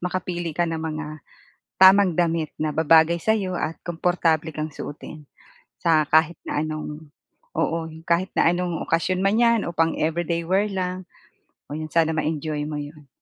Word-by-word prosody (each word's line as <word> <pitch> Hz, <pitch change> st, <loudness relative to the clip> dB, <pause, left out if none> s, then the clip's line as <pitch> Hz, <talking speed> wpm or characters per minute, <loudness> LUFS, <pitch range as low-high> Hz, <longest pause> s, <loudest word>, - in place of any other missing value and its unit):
makapili 175 Hz, -1 st, -3 dB
ka 175 Hz, -, +2 dB
ng 165 Hz, -1 st, -3 dB
mga 155 Hz, -1 st, -4 dB, 0.8 s
tamang 190 Hz, -1 st, +7 dB
damit 165 Hz, -2 st, 0 dB
na 155 Hz, -, +1 dB
babagay 160 Hz, +2 st, +4 dB
sa'yo 190 Hz, -1 st, 0 dB
at 160 Hz, -, -2 dB
komportable 165 Hz, -2 st, 0 dB
kang 155 Hz, +1 st, -3 dB
suotin. 150 Hz, +1 st, -9 dB, 0.5 s
Sa 160 Hz, -3 st, +3 dB
kahit 160 Hz, +2 st, +4 dB
na -, -, -2 dB
anong 155 Hz, 0 st, -6 dB, 0.5 s
oo, 165 Hz, -, 0 dB, 0.3 s
kahit 175 Hz, +3 st, +1 dB
na -, -, +4 dB
anong 175 Hz, -1 st, -1 dB
okasyon 180 Hz, +3 st, +1 dB
man 200 Hz, +3 st, +2 dB
yan 235 Hz, -2 st, +4 dB
o -, -, -4 dB
pang 165 Hz, 0 st, +3 dB
everyday 170 Hz, +1 st, -1 dB
wear 190 Hz, +5 st, +1 dB
lang, 185 Hz, 0 st, -3 dB, 0.6 s
o -, -, -9 dB
'yon 155 Hz, 0 st, -4 dB
sana 160 Hz, -1 st, +2 dB
ma-enjoy 155 Hz, -1 st, -2 dB
mo 150 Hz, -, -4 dB
'yon. 145 Hz, 0 st, -9 dB
165 Hz, 160 wpm, -23 LUFS, 155-180 Hz, 0.8 s, tamang